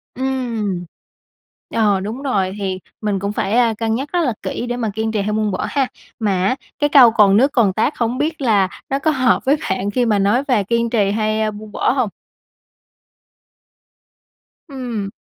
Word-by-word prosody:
Ừm. 235 -8 -2 0.9
Ờ, 205 -4 +3
đúng 220 +7 -5
rồi 195 -9 0
thì 190 -2 -2 0.2
mình 205 -3 -1
cũng, 200 +1 -2
ơ, - - -8
phải 225 +3 +2
cân 225 0 -1
nhắc 275 +4 -4
rất 355 - +2
là 255 -8 0
kỹ - - -3
để 245 - -2
mà 230 -3 -1
kiên 220 +1 -2
trì 210 -2 0
hay 210 +1 -2
buông 215 -1 0
bỏ 185 - -2
ha. 275 -3 +1 0.3
Mà 195 -4 +1
á 255 - +2 0.2
cái 290 - +2
câu 255 -5 +8
"Còn 205 -2 +5
nước 270 +5 +4
còn 210 -7 +3
tát" 220 +8 +1
hông 235 +1 -1
biết 305 +2 -2
là 205 -7 +3 0.2
nó 275 +1 0
có 310 +3 +2
hợp 255 -3 +2
với 275 - +4
bạn 190 +2 -1
khi 245 +2 +1
mà 210 -3 +2
nói 210 +7 +2
về 230 -6 +2
kiên 235 +3 0
trì 205 -4 +1
hay, 215 0 0
ơ, 215 0 0
buông 210 0 -10
bỏ - - +1
hông? 255 -5 0 2.6
Ừm. 240 -7 -4
220 Hz, 195 wpm, -19 LUFS, 205-255 Hz, 2.6 s, câu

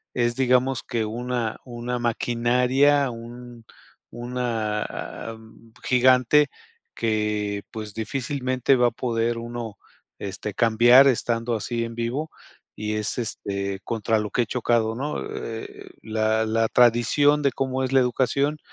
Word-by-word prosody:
es, 120 -1 +1
digamos 130 0 +2
que 115 -2 -2
una 120 0 -3
una 120 0 -4
maquinaria, 125 +4 +2
un 120 0 -10 0.5
una 120 -3 -2
a - - -7
a - - -10
mm 110 0 -18
gigante 130 +3 +4 0.5
que 105 -2 -1
pues 110 -2 -7
difícilmente 130 +2 0
va 125 -1 +4
a - - 0
poder 115 0 -1
uno, 115 -3 -6 0.4
este, 100 +1 -5
cambiar 120 +4 +6
estando 120 -2 0
así 115 +2 -2
en 115 0 -7
vivo 120 +7 -2 0.5
y 105 0 -3
es, 105 0 -2
este, 100 -4 -3
contra 110 -1 0
lo 105 0 -3
que 120 - +2
he - - -5
chocado, 115 -2 +1
¿no? 145 +5 -3
Eh 115 0 -6
eh, - - -13
la 110 0 +1
la 115 +1 +1
tradición 125 +5 +4
de 140 -1 +2
cómo 130 +1 -2
es 130 - -2
la 135 - +6
educación 140 +4 +1
120 Hz, 140 wpm, -24 LUFS, 110-125 Hz, 0.5 s, cambiar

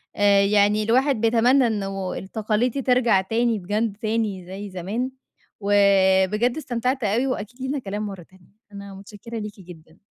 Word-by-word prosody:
آآ، 200 -1 +4
يعني 205 +1 +3
الواحد 250 +2 +2
بيتمنّى 240 +3 +4
إنه 195 -3 -3
التقاليد 215 +4 -1
دي 275 - -3
ترجَع 245 -6 +3
تاني 225 +2 0
بجد 205 +3 -2
تاني 215 -4 -2
زي 195 +2 -7
زمان، 200 +8 -4 0.5
وبجد 200 +3 +3
استمتعت 255 -2 -2
أوي 225 +6 +1
وأكيد 245 0 -5
لينا 270 +2 -2
كلام 205 -1 -4
مرَّة 195 -4 -7
تانية، 185 0 -23 0.2
أنا 200 -1 -9
متشكِّرة 210 +4 -9
ليكِ 210 -1 -8
جدًا. 165 -2 -15
210 Hz, 150 wpm, -23 LUFS, 195-235 Hz, 0.5 s, آآ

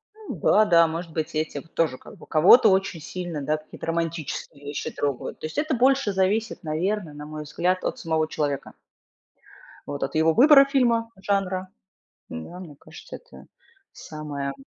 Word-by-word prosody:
Ну 435 -1 -8
да, 215 +1 +4
да, 170 -3 +5
может 165 +1 -5
быть, 160 0 -3
этим, 155 -2 -2
тоже 165 -4 -1
как 205 - -14
бы. - - -14
Кого-то 185 +9 +6
очень 190 -3 +1
сильно, 175 -2 -5
да, 150 +2 0
какие-то 155 - -11
романтические 165 -3 -4
вещи 145 0 -4
трогают. 140 -3 -3
То - - -6
есть 155 - -7
это 305 -1 0
больше 260 -3 +2
зависит, 200 +4 0
наверно, 170 +2 -2
на 150 0 -9
мой 155 0 -7
взгляд, 180 +5 -1
от - - -2
самого 160 -1 0
человека. 145 -3 -3 1.1
Вот 145 0 -4
от 135 - -4
его 160 +1 +3
выбора 275 - +7
фильма, 235 -5 +1
жанра. 190 -2 -1 0.6
М-да, 125 - -8
мне 165 -6 -10
кажется, - - -12
это - - -16 0.5
самое 145 -3 -6
165 Hz, 165 wpm, -24 LUFS, 155-200 Hz, 1.1 s, выбора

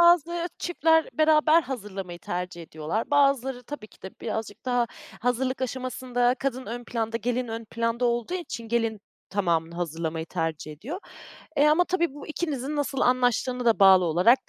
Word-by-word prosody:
Bazı 345 0 +4
çiftler 320 -2 +2
beraber 310 +1 +5
hazırlamayı 200 -9 -6
tercih 180 -1 -4
ediyorlar. 160 - -3
Bazıları 275 -3 +3
tabii 270 -4 -8
ki - - -23
de 190 - -6
birazcık 220 -1 -4
daha 245 -1 +2 0.3
hazırlık 255 +2 0
aşamasında 250 -1 0
kadın 260 -1 -2
ön 240 +1 -5
planda, 230 -1 -2
gelin 245 +1 -1
ön 225 +1 -5
planda 230 +2 -1
olduğu 240 +8 0
için 235 -10 -5
gelin 225 -2 0 0.3
tamamını 170 -4 0
hazırlamayı 165 -1 -3
tercih 160 -3 -3
ediyor. 250 - -6 0.6
E, 290 - +5
ama 320 +4 +5
tabii 340 -5 0
bu 290 - -9
ikinizin 300 -3 -3
nasıl 280 -2 -1
anlaştığına 250 0 +2
da 230 -2 +4
bağlı 190 -2 +7
olarak 185 +11 +4
245 Hz, 155 wpm, -26 LUFS, 205-275 Hz, 0.6 s, bağlı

